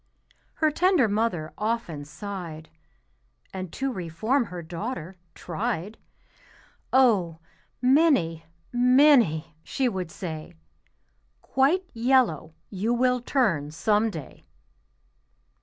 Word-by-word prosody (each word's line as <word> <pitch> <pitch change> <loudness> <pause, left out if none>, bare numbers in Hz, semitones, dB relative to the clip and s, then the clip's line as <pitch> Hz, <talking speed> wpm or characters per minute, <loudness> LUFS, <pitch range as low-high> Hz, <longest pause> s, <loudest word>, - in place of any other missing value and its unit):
Her 310 -1 +2
tender 355 - +3
mother 200 -7 -1
often 210 -9 -2
sighed, 160 -1 -7 0.8
And 185 -3 -5
to 270 -1 -2
reform 215 - -1
her 180 -4 -7
daughter 180 +1 -5 0.2
tried. 205 +2 -4 0.9
"Oh! 205 -11 +3 0.5
Minnie, 250 - +3 0.3
Minnie," 245 - +4
she 265 - -1
would 190 -7 -3
say, 160 -3 -7 0.9
"Quite 320 +8 +1
yellow 230 - +1 0.2
you 215 +5 0
will 250 0 +2
turn 200 - 0
some 210 +7 +1
day." 160 -9 -10
210 Hz, 90 wpm, -26 LUFS, 165-250 Hz, 0.9 s, Minnie